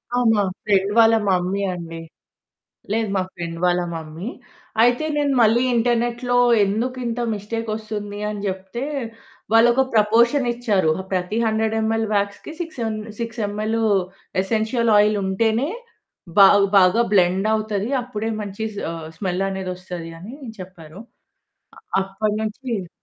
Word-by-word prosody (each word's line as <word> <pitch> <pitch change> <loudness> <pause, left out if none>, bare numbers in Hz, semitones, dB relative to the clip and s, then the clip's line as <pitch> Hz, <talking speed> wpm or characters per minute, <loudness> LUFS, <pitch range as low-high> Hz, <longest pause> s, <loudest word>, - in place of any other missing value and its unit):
ఆ! - - +2 0.2
మా 205 -1 +2 0.2
ఫ్రెండ్ 200 -1 +2
వాళ్ళ 225 0 +6 0.2
మమ్మీ 185 +2 +1
అండి. 165 -1 -7 0.9
లేదు 220 -1 0
మా 190 - +2
ఫ్రెండ్ 170 -1 -6
వాళ్ళ 180 0 +2
మమ్మీ. 160 +4 -7 0.5
అయితే 245 +6 +3
నేను 285 -2 +1
మళ్ళీ 230 +3 +4
ఇంటర్నెట్‌లో 240 +1 +1 0.3
ఎందుకింత 240 +3 -2
మిస్టేక్ 225 +2 -4
వస్తుంది 210 -2 -6
అని 210 -1 -5
జెప్తే, 190 +6 -4 0.7
వాళ్ళొక 240 +3 +5
ప్రపోర్షన్ 235 +5 +4
ఇచ్చారు. 210 -9 +1
"ఆ - - -10
ప్రతి 185 +4 -1
100 220 0 0
ఎంఎల్ 225 0 0
వ్యాక్స్‌కి 200 +9 -2
6 325 -6 -7
ఎం 220 -1 -2 0.2
6 230 -1 -4
ఎంఎల్ 215 +2 -2 0.6
ఎసెన్షియల్ 225 +3 0
ఆయిల్ 210 0 +4
ఉంటేనే 225 - +1 0.7
బా 195 - +10 0.3
బాగా 190 +5 +5
బ్లెండ్ 190 +2 +3
అవుతది. 215 0 -1
అప్పుడే 225 -2 -4
మంచి 205 +1 -5 0.3
ఆహ్, 165 -1 -7
స్మెల్ 185 -1 -1
అనేది 190 -1 -4
వస్తది." 180 -2 -7
అని 230 +8 -9 0.2
చెప్పారు. 180 0 -11 1.0
అప్పటి 205 +2 -2
నుంచి 215 -4 -4
215 Hz, 130 wpm, -22 LUFS, 190-230 Hz, 1.0 s, బా